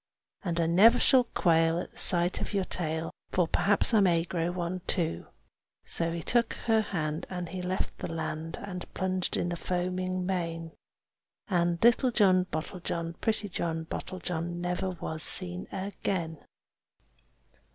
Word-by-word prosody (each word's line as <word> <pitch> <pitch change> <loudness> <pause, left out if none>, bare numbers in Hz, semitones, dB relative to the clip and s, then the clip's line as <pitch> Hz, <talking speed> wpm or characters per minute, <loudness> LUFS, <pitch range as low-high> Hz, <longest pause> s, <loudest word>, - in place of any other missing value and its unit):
And 170 -3 -1
I 165 - +3
never 210 +9 +6
shall 255 -2 +5
quail 165 -5 +2
at - - -6
the - - -21
sight 175 -1 +4
of - - -3
your 195 -2 +1
tail, 160 -2 -2 0.2
For 180 -2 +2
perhaps 205 +7 +2
I 220 - +6
may 175 -4 +4
grow 170 -1 -2
one 180 0 -3
too." 160 - -1 0.6
So 165 0 +1
he 170 -1 -4
took 235 -1 +1
her 225 -1 +4
hand, 160 -5 -3
and 180 -2 -4
he 185 +1 -5
left 185 +1 -3
the - - -4
land, 160 0 -4
And 180 -3 -7
plunged 185 -1 -1
in 175 - 0
the 175 - -2
foaming 185 +1 -2
main. 165 -3 -2 0.8
And 175 -2 +2
little 240 +2 +5
John 190 -6 +4
Bottlejohn, 165 0 -4
pretty 215 -2 0
John 165 -3 -3
Bottlejohn, 175 0 -4
Never 180 +2 -1
was 160 -3 -5
seen 90 - +1
again. 185 -4 -3
175 Hz, 150 wpm, -29 LUFS, 165-190 Hz, 0.8 s, never